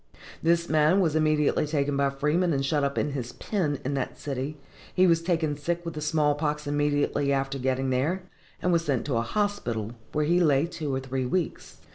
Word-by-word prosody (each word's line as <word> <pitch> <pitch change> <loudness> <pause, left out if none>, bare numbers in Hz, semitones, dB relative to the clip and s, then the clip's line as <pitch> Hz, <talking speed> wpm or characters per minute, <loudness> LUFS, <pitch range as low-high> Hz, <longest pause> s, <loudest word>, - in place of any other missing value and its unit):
This 170 +1 +2
man 155 +4 +4
was 165 -5 +2
immediately 155 -1 +2
taken 145 -1 0
by 140 0 +2
Freeman 150 +5 +1
and 135 -1 0
shut 145 +1 +1
up 140 0 -1
in 150 - 0
his 125 -4 -4
pen 165 -9 -1
in 140 - -1
that 135 -2 -3
city, 140 +1 -4 0.4
he 185 - +5
was 165 -2 +4
taken 165 -3 0
sick 170 +4 -3
with 165 - -4
the 150 - -5
small 150 -1 +2
pox 150 0 -2
immediately 145 -1 +1
after 135 0 -1
getting 130 +1 0
there, 155 +9 0 0.4
and 180 - +2
was 170 -1 +2
sent 140 -6 -1
to 135 -4 0
a - - +2
hospital, 120 - -1 0.2
where 150 0 0
he 175 +3 +3
lay 150 -4 +4
two 160 -4 -4
or - - 0
three 130 -1 -3
weeks. 175 +4 -3
150 Hz, 205 wpm, -27 LUFS, 135-165 Hz, 0.4 s, he